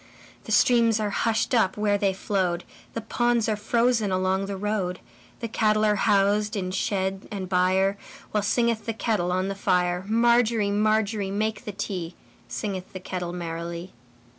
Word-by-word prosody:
The -, -, -6 dB
streams 230 Hz, -3 st, +4 dB
are 210 Hz, -1 st, -1 dB
hushed 225 Hz, +3 st, 0 dB
up 215 Hz, -6 st, +2 dB
where 210 Hz, -1 st, +2 dB
they 195 Hz, -1 st, +2 dB
flowed, 185 Hz, -2 st, -1 dB, 0.3 s
The 230 Hz, -, -2 dB
ponds 240 Hz, +1 st, +1 dB
are 215 Hz, -, +1 dB
frozen 230 Hz, 0 st, +1 dB
along 185 Hz, +1 st, 0 dB
the 200 Hz, -1 st, -4 dB
road, 195 Hz, -3 st, -2 dB, 0.4 s
The 230 Hz, -, -2 dB
cattle 215 Hz, -1 st, +2 dB
are 210 Hz, -, +4 dB
housed 205 Hz, +1 st, +2 dB
in 185 Hz, -2 st, -2 dB
shed 190 Hz, 0 st, -2 dB
and 195 Hz, -3 st, -5 dB
byreWhile 190 Hz, +3 st, 0 dB
singeth 235 Hz, +2 st, +1 dB
the 225 Hz, -, 0 dB
kettle 210 Hz, -6 st, 0 dB
on 185 Hz, +1 st, 0 dB
the 195 Hz, -, -2 dB
fire. 180 Hz, -2 st, +1 dB
Margery, 230 Hz, -2 st, +3 dB
Margery, 215 Hz, -1 st, +1 dB
make 215 Hz, +4 st, -2 dB
the 210 Hz, -, -4 dB
tea, 185 Hz, -4 st, -4 dB, 0.3 s
Singeth 190 Hz, -3 st, -5 dB
the 185 Hz, -, -5 dB
kettle 180 Hz, -1 st, -4 dB
merrily. 170 Hz, 0 st, -5 dB
200 Hz, 160 wpm, -25 LUFS, 185-220 Hz, 0.4 s, streams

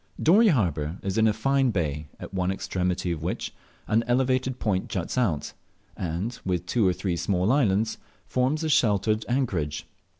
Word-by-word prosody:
Dorey 205 Hz, +8 st, +5 dB
harbour 85 Hz, -, +1 dB
is 95 Hz, +2 st, -1 dB
in 110 Hz, -, +5 dB
a -, -, +4 dB
fine 135 Hz, +5 st, +2 dB
bay, 75 Hz, -7 st, -2 dB
at -, -, -9 dB
one 90 Hz, -1 st, 0 dB
extremity 90 Hz, -2 st, -1 dB
of 80 Hz, -2 st, -3 dB
which 85 Hz, +4 st, -3 dB, 0.3 s
an 115 Hz, +2 st, +2 dB
elevated 130 Hz, +1 st, +1 dB
point 95 Hz, -6 st, -1 dB
juts 90 Hz, -4 st, -3 dB
out, 100 Hz, -, 0 dB, 0.4 s
and, 95 Hz, +7 st, -3 dB
with 90 Hz, -2 st, -1 dB
two 105 Hz, +2 st, +2 dB
or -, -, +4 dB
three 90 Hz, -1 st, -2 dB
small 90 Hz, +4 st, +1 dB
islands, 110 Hz, -5 st, +2 dB, 0.3 s
forms 135 Hz, +5 st, 0 dB
a 160 Hz, -, 0 dB
sheltered 110 Hz, -4 st, +2 dB
anchorage. 85 Hz, -, -1 dB
100 Hz, 165 wpm, -26 LUFS, 90-125 Hz, 0.4 s, Dorey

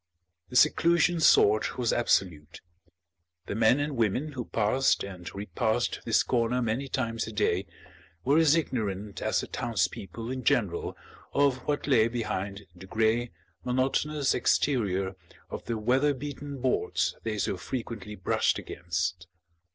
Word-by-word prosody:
The -, -, -9 dB
seclusion 170 Hz, +4 st, +4 dB
sought 110 Hz, -8 st, +4 dB
was 120 Hz, -2 st, +1 dB
absolute. 85 Hz, -9 st, 0 dB, 0.8 s
The -, -, -4 dB
men 110 Hz, +5 st, +4 dB
and 145 Hz, 0 st, -2 dB
women 115 Hz, +6 st, 0 dB
who 125 Hz, -4 st, -5 dB
passed 115 Hz, +5 st, +1 dB
and 95 Hz, -2 st, -7 dB
repassed 100 Hz, +2 st, -1 dB
this -, -, +3 dB
corner 120 Hz, 0 st, +1 dB
many 120 Hz, +3 st, -1 dB
times 115 Hz, -4 st, -2 dB
a -, -, -6 dB
day 95 Hz, -2 st, 0 dB, 0.6 s
were 145 Hz, +4 st, +4 dB
as 160 Hz, -1 st, +5 dB
ignorant 105 Hz, -, -2 dB
as -, -, +1 dB
the -, -, -7 dB
townspeople 115 Hz, +6 st, -3 dB
in 130 Hz, -1 st, -4 dB
general 100 Hz, -7 st, 0 dB, 0.4 s
of 140 Hz, -3 st, +3 dB
what 145 Hz, -1 st, -1 dB
lay 115 Hz, -6 st, +4 dB
behind 105 Hz, -4 st, -4 dB
the 95 Hz, +2 st, -12 dB
grey, 110 Hz, +3 st, +1 dB, 0.3 s
monotonous 135 Hz, +3 st, +1 dB
exterior 100 Hz, -8 st, +1 dB, 0.4 s
of -, -, -6 dB
the 115 Hz, -1 st, -2 dB
weather 130 Hz, +6 st, +2 dB
beaten 145 Hz, 0 st, -6 dB
boards 130 Hz, 0 st, 0 dB
they 110 Hz, -2 st, -3 dB
so 100 Hz, -, 0 dB
frequently 105 Hz, +2 st, -6 dB
brushed 95 Hz, -, +1 dB
against. 85 Hz, 0 st, -3 dB
115 Hz, 135 wpm, -28 LUFS, 100-135 Hz, 0.8 s, as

